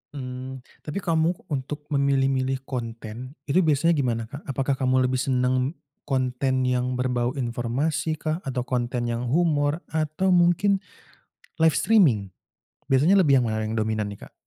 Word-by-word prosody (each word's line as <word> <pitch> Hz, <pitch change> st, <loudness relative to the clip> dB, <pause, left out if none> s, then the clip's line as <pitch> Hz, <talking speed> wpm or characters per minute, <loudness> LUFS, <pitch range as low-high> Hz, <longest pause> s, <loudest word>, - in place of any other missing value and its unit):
Mmm. 130 Hz, 0 st, -6 dB, 0.2 s
Tapi 155 Hz, +6 st, -3 dB
kamu, 165 Hz, +1 st, +2 dB, 0.2 s
untuk 145 Hz, +2 st, -3 dB
memilih-milih 135 Hz, -1 st, +1 dB
konten 120 Hz, +1 st, -6 dB
itu 170 Hz, +7 st, +3 dB
biasanya 160 Hz, 0 st, +3 dB
gimana, 120 Hz, -4 st, 0 dB
Kak? 140 Hz, -, -9 dB
Apakah 135 Hz, 0 st, 0 dB
kamu 130 Hz, 0 st, +3 dB
lebih 130 Hz, 0 st, -1 dB
senang 130 Hz, +3 st, +1 dB, 0.3 s
konten 130 Hz, 0 st, 0 dB
yang 125 Hz, 0 st, 0 dB
berbau 125 Hz, +1 st, -1 dB
informasi 130 Hz, +6 st, -1 dB
kah, 155 Hz, +2 st, -2 dB
atau 125 Hz, -2 st, -2 dB
konten 120 Hz, -1 st, -2 dB
yang 120 Hz, +1 st, -2 dB
humor, 150 Hz, +1 st, +1 dB
atau 160 Hz, +4 st, 0 dB
mungkin 180 Hz, +3 st, +4 dB, 0.8 s
live 160 Hz, -1 st, +4 dB
streaming? 150 Hz, -, +3 dB, 0.6 s
Biasanya 155 Hz, +9 st, +4 dB
lebih 140 Hz, -8 st, +5 dB
yang -, -, 0 dB
mana 110 Hz, 0 st, -1 dB
yang 110 Hz, -, -3 dB
dominan 110 Hz, -1 st, -1 dB
nih, 100 Hz, -, -11 dB
Kak? -, -, -40 dB
130 Hz, 145 wpm, -25 LUFS, 125-155 Hz, 0.8 s, lebih